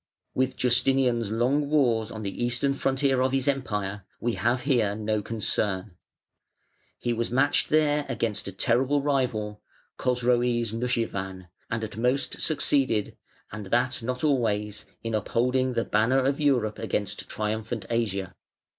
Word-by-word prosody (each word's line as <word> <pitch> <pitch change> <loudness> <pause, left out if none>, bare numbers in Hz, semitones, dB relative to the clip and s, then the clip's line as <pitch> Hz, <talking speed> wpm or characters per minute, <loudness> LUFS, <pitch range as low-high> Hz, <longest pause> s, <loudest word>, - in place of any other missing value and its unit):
_ - - -62 0.3
With 130 0 0
Justinian's 125 -2 +3
long 135 +6 +1
wars 120 -7 +2
on 110 -1 -7
the 100 +4 -3
Eastern 120 +3 +2
frontier 135 -1 +1
of 130 0 +2
his 135 0 +1
Empire 105 -8 -1 0.2
we 120 0 -1
have 120 +6 0
here 120 -7 +2
no 110 0 -1
concern. 105 -3 -1 1.0
He 120 - -1
was 115 0 -2
matched 135 +4 +2
there 150 -1 +2
against 110 -5 -2
a - - -3
terrible 130 +8 +1
rival, 115 -7 -1 0.4
Chosroes 120 -2 +1
Nushirvan, 95 -6 -2 0.2
and 115 0 -2
at 110 -1 -6
most 125 +4 0
succeeded 135 -8 +1 0.4
(and 105 -1 -7
that 120 +5 +1
not 125 +2 -3
always) 105 -7 0 0.2
in 115 0 -3
upholding 125 +4 +1
the 115 -1 0
banner 110 +5 +2
of 140 +2 +1
Europe 125 -8 +1
against 105 -2 -2
triumphant 110 +1 -3
Asia. 100 -5 -1
120 Hz, 140 wpm, -26 LUFS, 105-130 Hz, 1.0 s, Justinian's